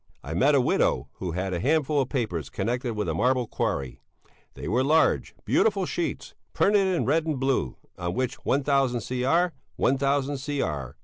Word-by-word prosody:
I 80 - -5
met 135 - +4
a 135 - +5
widow - - +1
who 90 -3 -4
had 95 +1 -2
a 85 - -1
handful 150 - +2
of 130 - -3
papers 90 - -2
connected 120 - -2
with 105 -2 -2
a 80 - 0
marble 125 +8 +2
quarry; 70 - -3 0.6
they - - -7
were 120 +8 +2
large, 155 +3 +2
beautiful 200 -4 +2
sheets, 175 -1 -3 0.2
printed 200 -1 +3
in 185 -3 0
red 160 +4 +1
and 150 -4 -1
blue, 135 - 0 0.2
on 85 0 -3
which 130 -1 -2
1000 135 -3 +1
Cr., 135 +10 +1 0.2
1000 140 +1 +1
Cr. 75 - -3
130 Hz, 170 wpm, -26 LUFS, 95-145 Hz, 0.6 s, a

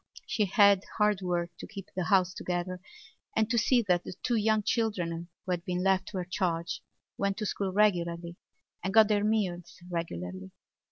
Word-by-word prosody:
She 215 - +1
had 200 -1 +5 0.2
hard 210 -2 +3
work 175 -1 -1
to - - -7
keep 195 -4 -9
the 185 -2 -1
house 185 +1 +3
together 180 0 -3 0.6
and 220 -1 +3
to 235 - +2
see 240 +1 +3
that 180 -3 +2
the - - -7
two 240 - +1
young 215 -1 +2
children 180 -7 -1 0.2
who 185 - -2
had 175 -1 -1
been 180 0 -2
left 190 0 +2
to 195 - -5
her 180 - -2
charge 175 -2 -2 0.4
went 200 0 0
to 215 - -2
school 195 -1 -2
regularly 170 -4 +1 0.5
and 190 +3 -2
got 220 -1 +7
their 205 -1 +2
meals 180 -6 -1
regularly. 95 - -4
185 Hz, 180 wpm, -29 LUFS, 175-210 Hz, 0.6 s, got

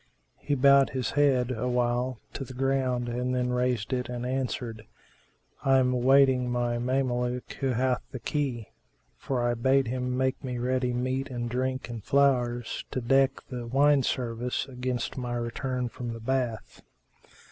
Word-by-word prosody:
He 145 - -1
bowed 140 0 +6
his 130 -4 -2
head 135 -4 +3
awhile 125 0 0
to 135 - -4
the 130 -1 -10
ground 130 -2 0
then 125 +1 -1
raised 125 -2 0
it 125 -1 -2
and 125 0 -4
answered, 125 -4 -3 0.8
"I 135 0 +5
am 125 -1 +3
awaiting 130 0 +4
my 120 -1 0
Mameluke 125 -1 -1
who 135 - 0
hath 130 0 +1
the 130 - -6
key; 130 -5 -2 0.5
for 125 -3 -2
I 120 - +2
bade 130 +2 +2
him 125 0 -2
make 130 0 0
me 125 -2 -3
ready 125 +1 0
meat 130 +2 -1
and 120 -2 -3
drink 130 +1 -1
and 115 -3 -7
flowers, 125 -4 +1
to - - -2
deck 135 +3 +2
the 120 -2 -5
wine 140 +3 +4
service 120 -1 -2
against 125 -1 -3
my 120 -1 -3
return 125 +2 -2
from 120 0 -6
the 115 - -7
bath." 120 -2 -2
125 Hz, 155 wpm, -28 LUFS, 120-130 Hz, 0.8 s, bowed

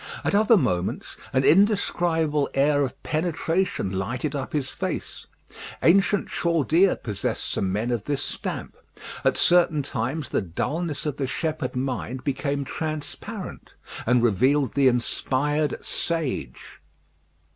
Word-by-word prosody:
At - - 0
other 215 +2 +5
moments 90 - -1 0.2
an 130 0 +2
indescribable 165 -5 +3
air 145 +1 +3
of 130 -3 -3
penetration 165 - -1
lighted 120 +10 -2
up 135 -1 -4
his 140 -3 -2
face. - - -5 0.6
Ancient 195 +3 +4
Chaldea 170 +2 +2
possessed 105 -4 -3
some 95 - -1
men 110 +5 -1
of 115 -3 -2
this 145 -2 -1
stamp. - - -4 0.5
At - - +2
certain 175 -4 +4
times 135 +3 -3
the - - 0
dullness 145 - -3
of 145 -2 -2
the 135 - -1
shepherd 155 +1 -2
mind 130 0 -3
became 140 0 -1
transparent, 160 +8 -6 0.3
and 125 0 +4
revealed 130 +5 +3
the 140 -2 +4
inspired 140 +4 0
sage. 165 -5 -3
145 Hz, 125 wpm, -25 LUFS, 130-165 Hz, 0.6 s, other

